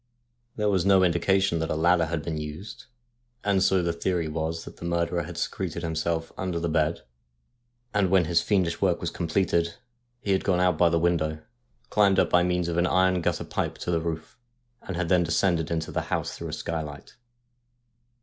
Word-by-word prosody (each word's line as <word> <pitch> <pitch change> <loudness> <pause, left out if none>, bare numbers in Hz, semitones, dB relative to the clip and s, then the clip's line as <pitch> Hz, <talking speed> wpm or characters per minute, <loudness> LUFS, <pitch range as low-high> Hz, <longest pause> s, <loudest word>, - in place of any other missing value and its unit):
There 105 -1 0
was 95 -3 +2
no 95 -1 +5
indication 95 0 +2
that 80 0 -2
a - - 0
ladder 85 +1 +3
had 80 -1 -3
been 80 -2 -3
used, 75 +7 -8 0.6
and 100 -2 +2
so 95 -1 +3
the 85 0 0
theory 85 -1 -1
was 80 +1 -3
that - - -11
the - - -11
murderer 85 0 0
had - - -7
secreted 85 - -3
himself 80 0 -2
under 90 -3 -2
the 85 - -1
bed, 80 +1 +1 0.9
and 100 -3 +2
when 95 -2 +4
his 85 +1 +2
fiendish 90 -5 0
work 90 -3 +2
was 85 - -3
completed 85 -1 0 0.4
he 100 - -2
had 95 - +2
gone 90 -3 +2
out 90 -1 +3
by 85 +2 +4
the 85 - +2
window, 80 -2 0 0.5
climbed 100 -2 +4
up - - +3
by 90 - +5
means 90 -1 0
of 85 -1 -2
an 85 +1 +3
iron 95 -1 +3
gutter - - -1
pipe - - -3
to - - -3
the 85 -1 +1
roof, 80 +6 -5 0.4
and 95 - -6
had 90 0 -1
then 90 +1 +4
descended 85 0 +1
into 80 -1 -2
the - - -1
house - - -2
through - - -6
a - - -6
skylight. 75 -3 -5
85 Hz, 195 wpm, -26 LUFS, 80-90 Hz, 0.9 s, no